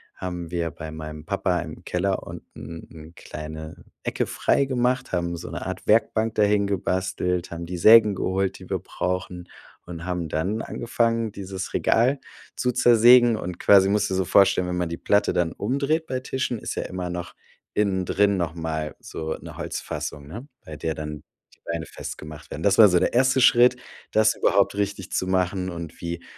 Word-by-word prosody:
haben 90 -2 -5
wir 85 -2 -2
bei 80 -1 -8
meinem 75 0 -8
Papa 90 -2 0
im - - -9
Keller 95 +2 -1
unten 80 0 -10
'ne 80 0 -12
kleine 80 +1 -8 0.2
Ecke - - -1
freigemacht, 130 -1 +1
haben 85 -1 -1
so 85 - -8
'ne 85 - -5
Art 95 - -5
Werkbank 110 0 +2
dahin 105 -1 +3
gebastelt, 90 -2 -1
haben 85 0 -5
die 90 +1 -5
Sägen 110 +1 +7
geholt, 95 +1 -1
die - - -13
wir - - -1
brauchen 90 -1 -4 0.4
und 85 0 -8
haben 90 -3 -3
dann 95 +9 -1
angefangen, 115 -2 -1
dieses 95 -1 -6
Regal 130 +5 +2 0.4
zu 125 - 0
zersägen. 120 0 +6
Und 90 -2 -6
quasi 100 -1 +6
musst 105 0 +1
du - - -2
dir - - 0
so - - +2
vorstellen, 95 -1 +4
wenn 90 0 -2
man 90 -1 0
die 85 - -3
Platte 100 0 +2
dann 85 -2 +1
umdreht 140 +8 -1
bei 130 -1 -2
Tischen, 130 -2 -2
ist - - -5
ja - - -2
immer 90 -1 -5
noch 90 0 -5 0.4
innen 95 -3 +1
drin 100 +1 +2
noch 85 -2 -2
mal 80 -2 -4
so 80 0 -5
'ne - - -10
Holzfassung, 70 -1 -5
ne, 115 - -9 0.2
bei 75 -1 -8
der 80 - -2
dann 75 -1 -6 0.3
die - - -38
Beine 85 -1 -3
festgemacht 75 0 -9
werden. 80 - -6
Das 100 -1 +3
war 110 -2 +9
so 90 -1 +4
der - - 0
erste 130 +1 +3
Schritt, 125 +1 +6 0.4
das 110 0 +3
überhaupt 100 0 +2
richtig 100 -2 -3
zu 95 - -1
machen, 95 0 0
und 85 -2 -7
wie 85 0 -5
95 Hz, 185 wpm, -24 LUFS, 85-110 Hz, 0.4 s, war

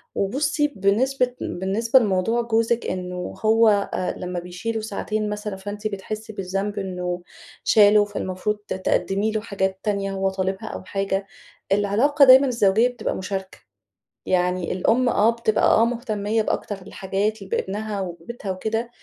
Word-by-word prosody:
وبُصي، 290 +8 +1
بنسبة 250 +3 +1
بالنسبة 220 +7 +2
لموضوع 215 +2 +1
جوزِك، 230 0 +1
إنه 180 -1 -4
هو 225 +1 +5 0.3
آآ 185 - -1
لما 180 -1 -4
بيشيله 180 +6 -4
ساعتين 215 0 -3
مثلًا، 210 -1 -4
فأنتِ 205 +2 -5
بتحسي 215 +2 -6
بالذنب 195 +1 -3
إنه 180 -2 -3 0.4
شاله، 210 -1 +6
فالمفروض 205 +1 -3
ت - - -2
تقدمي 195 +3 0
له 215 -1 -1
حاجات 190 -3 -2
تانية 200 -2 -1
هو 195 0 0
طالبها 190 +3 -3
أو - - -6
حاجة. 195 0 -2 0.4
العلاقة 220 +9 +4
دايمًا 265 +2 +8
الزوجية 230 -1 +3
بتبقى 245 -3 -3
مشاركة. 190 0 -5 0.7
يعني 180 -1 0
الأم، 235 +7 +2
آه، 215 0 +4
بتبقى 230 -2 0
آه، 225 - +5
مهتمية 220 -2 -1
بأكتر 205 -2 -3
الحاجات 195 +3 -2
بابنها 200 +2 -3
وبيتها 190 +4 -6
وكده، 220 +5 -2
205 Hz, 135 wpm, -23 LUFS, 190-225 Hz, 0.7 s, دايمًا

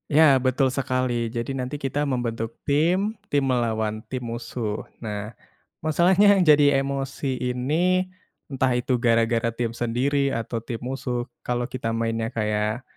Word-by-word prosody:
Ya 160 - +8 0.2
betul 130 +1 +3
sekali, 130 -2 0 0.2
jadi 115 +3 -2
nanti 125 +3 -3
kita 140 +1 -1
membentuk 115 -2 -2 0.2
tim 180 +9 +2 0.2
tim 145 -1 +2
melawan 110 -3 0
tim 130 - -2
musuh. 115 -2 -4 0.2
Nah 105 -1 -5 0.5
masalahnya 185 +6 +5
yang 190 - +3
jadi 145 -3 +5
emosi 135 -1 -3
ini 160 +10 0 0.4
entah 130 -1 +1
itu 125 0 0
gara-gara 115 -1 +2
tim 120 -1 -1
sendiri 125 +5 0
atau 115 0 -3
tim 115 0 -6
musuh, 125 -1 -3 0.2
kalo 120 0 0
kita 120 -2 -3
mainnya 115 0 -1
kayak 105 +1 -1
125 Hz, 140 wpm, -24 LUFS, 115-140 Hz, 0.5 s, Ya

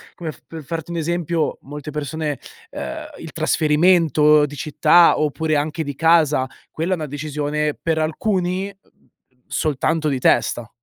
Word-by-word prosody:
come 160 -3 -5
f - - -21
per 165 -1 -8
farti 165 +2 -5
un 170 - -3
esempio: 170 -1 -1
molte 145 +2 -8
persone 150 0 -3 0.3
ehm, - - -6
il - - -8
trasferimento 150 -2 +4
di 145 0 -8
città 155 +4 +5
oppure 155 +1 0
anche 155 +2 -1
di 145 -1 -5
casa 155 -4 +3 0.2
quella 170 +4 -2
è - - +2
una 160 -3 -4
decisione 150 +1 -2
per 160 -1 0
alcuni, 185 +3 -1
uhm, 200 -1 -18 0.4
soltanto 155 +1 0
di 135 -2 -1
testa. 120 -1 +1
155 Hz, 150 wpm, -21 LUFS, 150-165 Hz, 0.4 s, città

